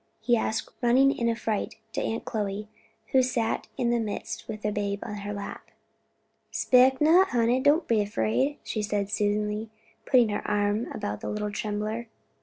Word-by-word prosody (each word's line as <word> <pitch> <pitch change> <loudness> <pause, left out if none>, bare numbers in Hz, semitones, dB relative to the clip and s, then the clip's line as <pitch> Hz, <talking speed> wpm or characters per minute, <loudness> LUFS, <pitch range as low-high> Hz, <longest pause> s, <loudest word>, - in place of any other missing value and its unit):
he 240 - +2
asked, 220 -1 -1
running 260 +3 +4
in 235 0 0
affright 225 -2 -2 0.2
to - - -1
Aunt 225 - -2
Chloe, 210 -2 -3 0.4
who 265 - +5
sat 240 -3 -1
in 240 -1 +1
their 240 - +2
midst 215 -3 -4
with 215 -1 -6
the 210 - 0
babe 200 -1 -1
on 210 - -5
her 205 0 -5
lap. 205 -1 -7 0.8
"Spect 260 +1 +4
not, 340 +5 +6
honey; 240 0 +2
don't 290 +5 +3
be 220 -3 +3
'fraid," 230 +7 0
she 215 - -3
said 205 -1 -1
soothingly, 210 +1 0 0.4
putting 245 -4 +5
her 205 - -1
arm 205 +2 +1
about 105 +1 -4
the - - -4
little 210 0 -2
trembler. 215 +3 -3
220 Hz, 170 wpm, -27 LUFS, 210-245 Hz, 0.8 s, not